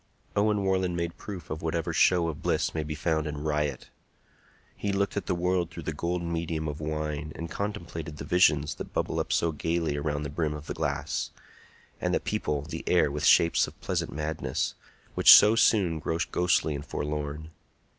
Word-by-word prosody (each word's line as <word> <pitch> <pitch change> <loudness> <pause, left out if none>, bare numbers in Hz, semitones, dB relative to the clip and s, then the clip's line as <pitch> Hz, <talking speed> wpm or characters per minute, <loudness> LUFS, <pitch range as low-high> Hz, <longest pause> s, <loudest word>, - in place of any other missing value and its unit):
Owen 105 0 +2
Warland 95 -2 +1
made 85 0 -2
proof 90 -8 -8
of 75 - -4
whatever 80 0 -2
show 90 -2 +4
of 80 -3 -5
bliss - - 0
may 80 - -1
be 75 0 -4
found 80 0 0
in 75 0 -5
riot. 75 -3 -2 0.8
He 100 - -2
looked 100 0 0
at 100 -3 -3
the 90 - +1
world 90 -1 0
through - - -8
the - - -3
golden 85 0 -2
medium 80 -1 -2
of 75 +1 -5
wine, 75 -1 -3
and 85 0 -6
contemplated 85 -6 -5
the 70 - -6
visions 75 -3 +3
that - - -8
bubble - - -1
up - - -2
so 85 - +2
gayly 80 0 -1
around 75 0 -2
the 70 - -5
brim 75 -1 -1
of 75 0 -8
the - - -4
glass, 70 0 -2 0.7
and - - 0
that - - -1
people 75 -2 -1
the 80 +2 -6
air 85 -5 +3
with 75 0 -2
shapes 85 - +5
of - - -13
pleasant - - -2
madness, 75 -3 -2 0.4
which - - +10
so 105 +2 +7
soon 95 -8 +3
grow 80 +1 -2
ghostly 90 -3 +2
and 70 0 -6
forlorn. 75 +1 -4
80 Hz, 190 wpm, -28 LUFS, 75-85 Hz, 0.8 s, which